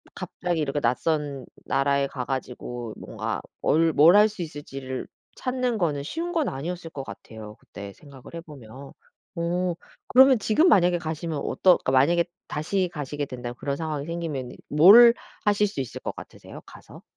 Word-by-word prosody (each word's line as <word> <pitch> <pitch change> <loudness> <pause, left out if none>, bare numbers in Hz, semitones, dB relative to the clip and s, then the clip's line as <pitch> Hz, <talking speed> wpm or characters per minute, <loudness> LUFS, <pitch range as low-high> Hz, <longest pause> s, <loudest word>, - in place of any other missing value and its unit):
갑자기 175 -2 -3
이렇게 145 0 -1
낯선 140 +2 -1 0.2
나라에 140 0 +1
가 130 -2 -6
가지고 120 -3 -5
뭔가 - - -5 0.2
뭘 165 +1 +2
뭘 160 +6 +6
할 210 +1 +7
수 205 -3 -9
있을지를 135 -4 -6 0.3
찾는 255 -2 -2
거는 150 -7 -1
쉬운 335 - -4
건 325 -5 0
아니었을 165 +5 -5
것 140 - -6
같아요 105 0 -10
그때 100 0 -10
생각을 140 -1 -16
해 165 - -6
보면. 135 -3 -12 0.5
어 175 +1 -1 0.3
그러면 265 -1 +6
지금 225 - +3
만약에 175 - +4
가시면 160 -1 -4
어떠 185 - +3
그러니까 - - -2
만약에 160 +7 +4 0.2
다시 180 +5 -1
가시게 145 -1 -4
된다면 125 -2 -7
그런 140 -1 -2
상황이 150 -2 -4
생기면은 160 -7 -5
뭘 210 +10 +8 0.3
하실 210 -1 +2
수 195 -9 -4
있을 130 - -7
것 - - -5
같으세요 - - -12
가서? - - -14
150 Hz, 345 characters per minute, -25 LUFS, 135-180 Hz, 0.5 s, 뭘